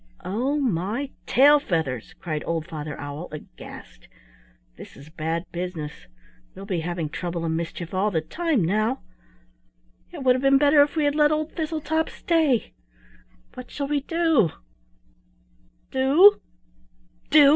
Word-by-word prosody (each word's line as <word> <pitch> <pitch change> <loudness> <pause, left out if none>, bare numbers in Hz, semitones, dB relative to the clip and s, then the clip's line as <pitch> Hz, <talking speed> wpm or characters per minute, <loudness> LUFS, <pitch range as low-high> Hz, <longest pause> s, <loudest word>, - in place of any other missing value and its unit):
"Oh, 255 +9 -1
my 235 - -1 0.2
tail 290 +3 +6
feathers!" 160 - -3
cried 155 -3 -4
old 165 -2 -1
Father 155 -3 -6
Owl 145 +4 -6
aghast. - - -11 0.7
"This - - -12
is 140 +2 -13
bad 160 +1 -2
business; 170 - -6 0.5
we'll 195 - -9
be 190 -4 -2
having 170 -1 -3
trouble 170 +2 -4
and 160 0 -1
mischief 170 +1 -5
all 190 +3 +1
the 170 -6 0
time 285 - 0
now. 215 +8 0 1.1
It 320 -6 -7
would 255 -1 +5
have 255 - -2
been 275 0 +5
better 290 +1 +5
if 290 +2 +2
we 310 -2 +1
had 290 - +2
let 300 0 +4
old 310 +1 -1
Thistletop 320 0 -2
stay. 315 -8 +1 0.8
What 250 -1 -9
shall 280 -1 -4
we 295 -1 +1
do?" 325 - +2 1.4
"Do! 285 +10 +6 0.9
do!" 290 -2 +7
220 Hz, 140 wpm, -24 LUFS, -, 1.4 s, do